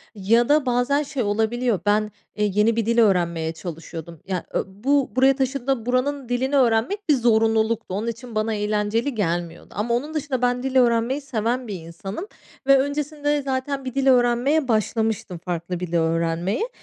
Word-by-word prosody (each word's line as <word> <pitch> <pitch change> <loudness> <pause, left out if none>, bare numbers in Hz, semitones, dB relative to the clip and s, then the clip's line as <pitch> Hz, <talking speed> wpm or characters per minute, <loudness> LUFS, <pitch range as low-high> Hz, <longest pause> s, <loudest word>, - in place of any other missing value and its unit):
ya 230 +6 +2
da 295 -1 +4
bazen 250 +4 +1
şey 280 -3 -3
olabiliyor. 220 +1 0
Ben, 210 +1 +2 0.2
eee, 210 - +1
yeni 210 +3 +3
bir 230 -2 0
dil 235 +1 +1
öğrenmeye 170 -6 +2
çalışıyordum. 165 -1 -8
Ya, 185 -2 -2
e - - +4
bu 260 +8 0
buraya 265 +1 +5
taşındığında 265 -2 -1
buranın 255 +1 -1
dilini 260 +3 0
öğrenmek 260 - +1
bir 295 - +6
zorunluluktu. 225 -3 +2
Onun 215 +3 -2
için 235 0 -6
bana 215 +1 0
eğlenceli 210 +5 -1
gelmiyordu 170 -4 -3
ama 225 +3 0
onun 285 +6 -2
dışında 285 -5 -2
ben 245 0 +1
dil 265 0 -3
öğrenmeyi 240 +2 +3
seven 245 -1 -2
bir 205 - -4
insanım 195 - -7 0.4
ve 275 0 +7
öncesinde 290 +1 -1
zaten 270 0 -3
bir 255 0 -5
dil 275 0 +1
öğrenmeye 250 +4 +3
başlamıştım, 220 -4 -1
farklı 175 0 -4
bir 180 - -4
dil 170 - -4
öğrenmeye. 165 - 0
235 Hz, 170 wpm, -23 LUFS, 205-265 Hz, 0.4 s, ve